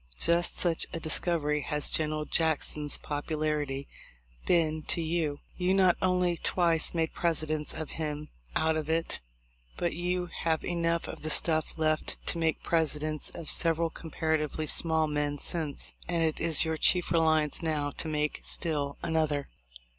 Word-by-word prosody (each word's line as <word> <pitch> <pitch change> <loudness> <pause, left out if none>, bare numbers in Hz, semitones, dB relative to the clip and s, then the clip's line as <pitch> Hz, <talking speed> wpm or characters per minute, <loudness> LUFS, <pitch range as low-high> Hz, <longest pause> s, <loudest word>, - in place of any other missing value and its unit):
Just 170 +1 +2
such 170 -2 +1
a 165 - -3
dis 155 -1 +3
covery 150 -4 0
has 150 -2 -1
General 155 -1 0
Jackson's 150 -2 0
popularity 150 -2 -2 0.6
been 160 -3 +2
to - - +1
you. 160 -3 -1 0.2
You 185 +1 +1
not 185 -2 +5
only 180 -2 +1
twice 170 -1 +2
made 160 -1 0
Presidents 155 -3 +2
of 155 - -5
him 150 -1 -4 0.3
out 160 0 +2
of 155 -1 -3
it, 165 - 0 0.6
but 175 - -1
you 180 +2 -1 0.2
have 160 -1 0
enough 170 -1 -1
of - - -8
the 155 - -3
stuff 155 0 0
left 155 -1 0
to 170 - +1
make 160 -1 0
Presidents 155 -2 +1
of 165 -3 -1
several 165 -1 +4
comparatively 155 -1 -2
small 160 +1 +2
men 150 -1 -1
since; 155 -1 -3
and 170 -2 0
it 160 -1 0
is 165 -1 +4
your 160 0 -1
chief 180 +1 +2
reliance 160 -2 +2
now 150 -3 -1
to 160 - -3
make 150 -1 -1
still 145 -5 -2
another. 155 -3 0
160 Hz, 155 wpm, -29 LUFS, 150-170 Hz, 0.6 s, not